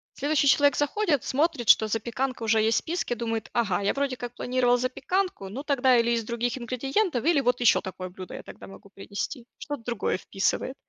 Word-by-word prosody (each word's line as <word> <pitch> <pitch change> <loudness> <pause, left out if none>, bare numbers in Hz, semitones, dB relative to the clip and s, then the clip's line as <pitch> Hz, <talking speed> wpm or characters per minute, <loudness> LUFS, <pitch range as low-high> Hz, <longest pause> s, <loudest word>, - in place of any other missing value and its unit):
Следующий 290 0 +1
человек 285 +1 +5
заходит, 295 - +1
смотрит, 290 -4 0
что 220 - +6
запеканка 235 +3 -2
уже 220 0 +3
есть 220 +1 +2
в - - +4
списке, 325 -7 -2
думает: 225 -1 -3
"Ага, 205 -6 +1
я 200 - +1
вроде 275 -2 -1
как 245 0 -7
планировал 245 -1 +2
запеканку, 260 - -2
ну, 265 +8 -6
тогда 265 -4 +3
или 235 0 +2
из 230 -1 0
других 235 +3 -2
ингредиентов, 265 - -1
или 320 -4 +4
вот 245 0 +1
еще 240 - +5
такое 185 -1 -7
блюдо 185 0 -9
я - - -8
тогда - - -12
могу 195 +1 -14
принести". 210 +5 -6
Что-то 290 -4 -6
другое 235 -5 -1
вписывает. 200 +6 -1
245 Hz, 195 wpm, -26 LUFS, 225-280 Hz, -, что